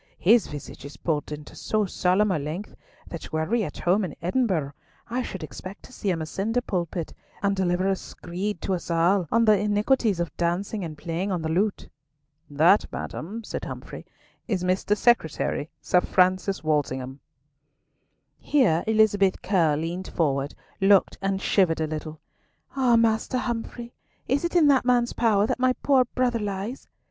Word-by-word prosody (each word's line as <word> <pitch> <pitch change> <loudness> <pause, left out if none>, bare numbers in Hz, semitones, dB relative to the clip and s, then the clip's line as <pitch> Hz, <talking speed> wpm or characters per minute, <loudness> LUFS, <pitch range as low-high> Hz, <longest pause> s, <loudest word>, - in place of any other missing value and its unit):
His 225 +5 +4
visage 145 -2 -9
is 140 +1 -10
pulled 150 -3 -2
into 150 0 -8
so 215 -1 0
solemn 190 +2 +2
a 170 - 0
length 155 +8 -5 0.3
that 170 - -8
were 160 0 0
we 235 +6 +1
at - - -6
home 185 +4 +2
in 175 -6 -4
Edinburgh, 180 - 0 0.4
I 245 +2 -2
should 190 -8 -6
expect 185 +5 -9
to - - -14
see 205 - -3
him 165 -3 -1
ascend 200 +8 -2
a 245 - +2
pulpit, 170 -4 -3 0.3
and 200 0 +2
deliver 185 0 +1
a 195 - +2
screed 185 +2 -5
to 190 - 0
us 175 -1 -4
all 170 +2 +2
on 230 +1 +4
the 215 -1 +6
iniquities 210 0 +1
of 170 - -3
dancing 185 +4 -1
and 155 -3 -6
playing 175 +5 -3
on 175 -3 -2
the 160 - -2
lute!" 195 +6 0 0.6
"That, 160 +8 +4
madam," 215 +8 -6
said - - -5
Humfrey, - - -8 0.4
"is 190 -6 -1
Mr. 185 +3 +1
Secretary, 165 -9 +1
Sir 180 - +3
Francis 185 +1 +1
Walsingham." 135 -3 -1 1.2
Here 215 - +2
Elizabeth 205 -3 +3
Curll 160 -6 +2
leant 175 +3 -4
forward, 140 -3 -1 0.3
looked, 195 0 +4
and 195 0 0
shivered 185 -5 +2
a 160 - +1
little. 155 0 -6 0.6
"Ah, 255 -3 +4
Master 230 +2 +2
Humfrey, 240 -1 -4 0.3
is 275 +5 +1
it 340 +1 -2
in 335 -3 +6
that 270 -2 +4
man's 245 -1 +2
power 210 -4 +3
that 230 - -2
my 255 0 +3
poor 265 -3 +4
brother 245 -1 0
lies?" 205 +4 -4
190 Hz, 170 wpm, -25 LUFS, 165-220 Hz, 1.2 s, the